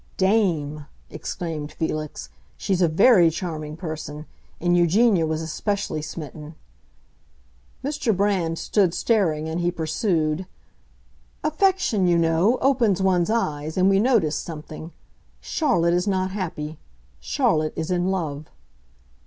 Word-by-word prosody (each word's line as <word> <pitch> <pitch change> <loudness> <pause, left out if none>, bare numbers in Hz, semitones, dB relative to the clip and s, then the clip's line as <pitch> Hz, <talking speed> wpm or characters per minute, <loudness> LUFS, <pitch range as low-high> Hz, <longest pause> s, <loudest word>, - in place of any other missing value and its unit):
"Dame!" 165 -8 +1 0.2
exclaimed 155 -1 -5
Felix, 155 -2 -4 0.3
"she's 190 -2 -1
a 175 - +5
very 175 +2 +5
charming 155 -2 -5
person; 155 -3 -6 0.3
and 175 +1 +2
Eugenia 175 +1 +3
was 160 +1 -2
especially 165 0 -2
smitten." 150 0 -8 1.3
Mr. 255 -7 0
Brand 190 -5 +1
stood 185 -3 +1
staring, 165 -9 +1
and 160 +2 -3
he 175 - +2
pursued, 165 0 -1 1.0
"Affection, 310 - +2
you 175 -1 +4
know, 170 +8 +3
opens 240 -8 +3
one's 185 -2 +2
eyes, 155 -9 -1
and 185 +1 +4
we 195 - +4
noticed 210 - +2
something. 155 0 -8 0.5
Charlotte 175 - +1
is 180 +3 0
not 185 -1 0
happy! 160 -6 -5 0.4
Charlotte 155 -1 0
is 160 +2 -3
in 180 +1 +1
love." 155 -6 -3
170 Hz, 120 wpm, -23 LUFS, 155-195 Hz, 1.3 s, a